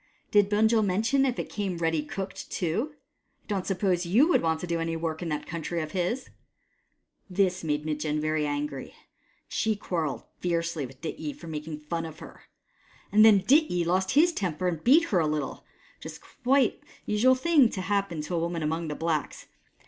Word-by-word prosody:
Did 205 -1 +4
Bunjil 220 +1 +3
mention 225 +8 +2
if 255 - -1
it - - -3
came 195 -4 -3
ready 165 -2 +1
cooked 195 +5 -6
too? 220 - -2 0.5
I - - -34
don't 195 -3 -2
suppose 185 -2 +1
you 215 - +4
would - - +4
want 160 -1 0
to - - -3
do 170 -1 -1
any 165 0 -2
work 160 0 -3
in 170 - -3
that 150 -1 -3
country 170 +1 -4
of 155 -1 -4
his! 190 +9 -2 0.5
" - - -47
This 185 -2 +2
made 150 -1 -1
Mitjen 150 0 -1
very 155 0 0
angry, 145 -2 -3
and - - -16 0.5
she 220 -1 0
quarrelled 160 - -3 0.2
fiercely 170 -4 -1
with 130 +1 -17
Dityi 155 -2 -5
for - - -12
making 155 -1 -6
fun 165 +2 -3
of 160 -1 -10
her; - - -13 0.7
and 215 +1 +6
then 210 -3 +7
Dityi 205 - +3
lost 185 +2 +1
his 340 +3 +5
temper 185 - -2
and 165 -3 -2
beat 295 +7 +6
her 185 - +3
a 160 - +2
little, 150 -3 -3 0.3
which - - -13
was - - -7
quite 265 -1 +1 0.3
a - - -3
usual 245 +5 +4
thing 280 -2 +4
to 190 - -4
happen 195 -4 -1
to 150 - -6
a 170 - +1
woman 170 -1 -2
among 160 +2 -1
the 150 - -3
blacks. 160 -3 -2
175 Hz, 200 wpm, -27 LUFS, 155-210 Hz, 0.7 s, then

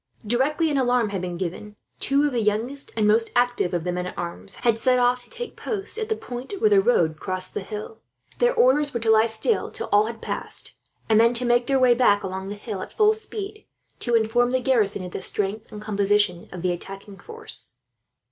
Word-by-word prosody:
Directly 290 +8 +2
an 280 - +1
alarm 245 -3 +2
had 195 -3 -3
been 180 -1 -4
given, 190 +4 -5 0.2
two 280 +1 +3
of 295 - +1
the 235 - +1
youngest 225 +7 -1
and 215 -1 +3
most 225 +2 +3
active 245 -6 +1
of 175 -3 -2
the 180 - -1
men 180 0 -3
at - - -9
arms 175 +3 -3
had 230 -2 +1
set 255 +1 +3
off, 245 0 +2
to 240 - -19
take 485 - -7
post 420 0 -1
at 440 - -3
the 440 - +1
point 260 - -7
where 430 0 +3
the 400 -1 +6
road 160 - +2
crossed 185 -1 -3
the - - -3
hill. 215 +2 -7 0.4
Their - - +3
orders 290 - +3
were - - +1
to 225 -1 +2
lie 220 +1 +5
still 230 - 0
till - - -4
all 205 +1 +4
had 230 0 -6
passed, - - -4 0.3
and 220 -1 +4
then 235 +1 +4
to 250 +1 +2
make 240 0 +2
their 275 - +2
way 255 -1 +5
back 210 -4 +3
along 190 0 -5
the 205 - -5
hill, 205 -2 -6
at - - -8
full 430 0 +4
speed, 425 -1 -7 0.3
to 240 -1 +1
inform 230 +2 +2
the 255 +1 +1
garrison 215 -7 +1
of 180 - -8
the - - -5
strength 210 +4 -3
and 210 - -8
composition 205 -3 0
of 180 -1 -7
the 180 - +1
attacking 195 +3 -8
force. 450 -1 -7
230 Hz, 225 wpm, -24 LUFS, 200-265 Hz, 0.4 s, the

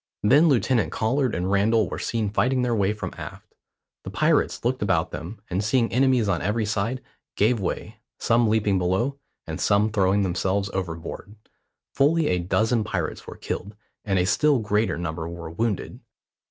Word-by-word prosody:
Then 145 +10 +5
Lieutenant 115 - +2
Collard 125 +2 0
and 90 +2 -1
Randall 105 +2 +3
were - - -5
seen 110 -3 -2
fighting 125 +4 +1
their 120 -1 +1
way 100 -3 +2
from 105 - -5
aft. - - -10 0.5
The - - -6
pirates - - +1
looked 130 +2 0
about 90 -5 +1
them, 80 +8 -7
and 95 +3 -2
seeing 115 +2 +1
enemies 130 -3 +3
on 100 - 0
every 105 +4 0
side, 110 +5 -2 0.3
gave 110 +3 +2
way, 95 - -4 0.2
some 115 0 +2
leaping 105 -3 +2
below, 95 +11 0 0.3
and - - -5
some 105 +2 +2
throwing 100 -1 +2
themselves 95 +2 -1
overboard. 90 +3 -5 0.6
Fully 155 +3 +3
a 90 - +1
dozen 110 +6 +1
pirates 105 - -4
were - - -9
killed, 100 +3 -5 0.3
and 100 -2 0
a 90 - +2
still 145 +9 +3
greater 105 -4 0
number 80 -1 -4
were 85 -1 -7
wounded. 105 +3 -2
105 Hz, 165 wpm, -24 LUFS, 95-120 Hz, 0.6 s, Then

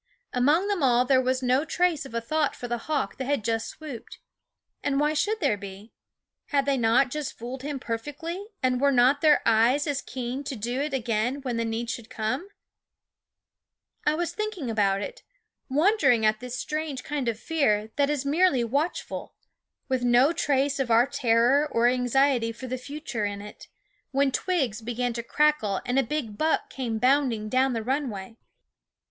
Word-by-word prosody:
Among 295 +9 +3
them 405 -4 -1
all 250 -2 +4
there 260 0 +4
was 255 0 0
no 255 +3 +3
trace 325 -3 0
of 235 - -10
a 230 - 0
thought 305 +5 0
for 245 - -6
the 240 0 -2
hawk 300 -3 -1
that 265 - -3
had 280 -4 0
just 225 0 -1
swooped. 290 -7 -9 0.6
And 280 -1 0
why 300 +1 +2
should 425 +8 0
there 280 - +1
be? 200 +2 -10 0.5
Had 280 -2 +1
they 280 -1 +2
not 245 +2 +3
just 300 -1 -4
fooled 250 +3 -6
him 285 0 -4
perfectly, 295 - -5 0.2
and 255 0 +1
were 280 0 +4
not 260 +3 +4
their 305 -2 +5
eyes 230 +6 +4
as 285 -3 -1
keen 255 +2 -5
to 270 - -4
do 240 +4 -2
it 300 - -2
again 245 +2 -1
when 245 -3 -2
the 230 - 0
need 225 +1 -3
should 235 -2 -7
come? 255 - -3 1.5
I 300 - +2
was 345 +1 -1
thinking 425 - -3
about 200 -2 +1
it, - - -7 0.5
wondering 280 - +3
at 215 0 +2
this 250 0 -6
strange 300 -2 -3
kind 280 -3 -3
of 225 -2 -1
fear 220 -10 0
that 285 -1 +3
is 290 -2 -1
merely 290 -3 +3
watchful, 285 +9 -3 0.5
with 260 -2 0
no 245 +6 +4
trace 280 -3 +1
of 265 -3 -1
our 230 +1 +5
terror 270 +1 +3
or 230 -1 +2
anxiety 250 -1 +2
for 230 +3 -9
the 255 0 -4
future 275 -5 -4
in 205 0 -3
it, 210 +1 -11 0.4
when 275 0 +2
twigs 265 - -1
began 240 +1 -2
to 235 - -3
crackle 235 -7 +1
and 250 +2 +1
a - - +5
big 240 -5 -4
buck 315 +1 +1
came 240 -4 -3
bounding 250 -3 +2
down 260 +2 +2
the 225 -1 -2
runway. 235 -6 -3
260 Hz, 180 wpm, -26 LUFS, 230-290 Hz, 1.5 s, their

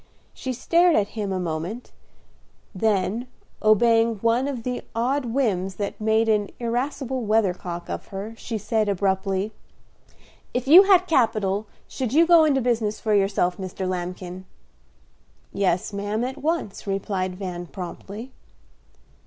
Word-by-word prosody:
She 260 - -4
stared 335 +7 +3
at 205 -1 +2
him 210 -3 -4
a 190 - -1
moment, 175 +7 -4 0.8
then, 215 +3 0 0.3
obeying 225 +1 +4
one 230 +5 +1
of 255 -5 -4
the 250 0 -3
odd 255 +4 0
whims 210 -7 0
that 205 +1 -4
made 220 +1 +2
an 210 -2 +2
irascible 255 +2 -2
weathercock 185 -5 0
of - - -5
her, 200 +3 -6
she 225 0 -5
said, 215 0 0
abruptly, 195 +1 0 1.0
"If 250 +1 -1
you 355 +7 +9
had 375 -2 +5
capital 215 - +1 0.2
should 255 -2 -3
you 325 +3 +6
go 335 -2 +6
into 275 -3 +2
business 230 -3 0
for 215 - 0
yourself, 195 -3 +2
Mr. 190 0 -4
Lambkin?" 180 0 -5 1.1
"Yes, 190 0 0
ma'am, 205 +3 -2
at 260 +2 -4
once," 310 - -2
replied 195 -1 -2
Van, 180 -2 -5
promptly. 200 +7 -8
215 Hz, 135 wpm, -24 LUFS, 190-245 Hz, 1.1 s, you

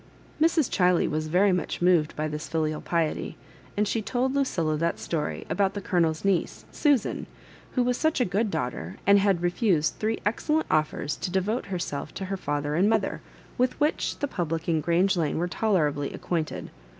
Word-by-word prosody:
mA 320 - +6
Chiley 195 - +2
was 155 0 -2
very 185 +5 +4
much 180 -1 -1
moved 175 -4 +3
by 155 +1 -1
this 150 0 -5
filial 155 -1 -1
piety, 165 -3 -1 0.4
and 210 0 +2
she 225 - 0
told 255 +4 -1
Lucilla 175 - 0
that 165 +2 0
story 155 -3 -3
about 195 -1 0
the - - -2
Colonel's 170 -3 0
niece, 195 -3 0
Susan, 290 -6 +1 0.5
who 250 - +2
was 245 0 +1
such 315 -2 +1
a 250 - +3
good 205 +4 0
daughter, 125 - -3
and 200 +1 +6
had 195 -3 +2
refused 175 -3 +1
three 220 +1 0
excellent 305 +9 +1
offers, 155 -1 0
to - - -3
devote 190 +6 -1
herself 175 -7 -4
to 190 - -4
her 195 +1 -2
fether 145 -4 -2
and 185 +7 +3
mother, 220 -3 0 0.4
with 250 0 +2
wliich 295 +1 0
the 285 - -1
public 165 - -3
in 160 -2 +2
Grange 175 +5 +2
Lane 160 -4 0
were 175 +2 0
tolerably 155 -8 0
acquainted. 165 -3 -3
180 Hz, 180 wpm, -26 LUFS, 155-215 Hz, 0.5 s, mA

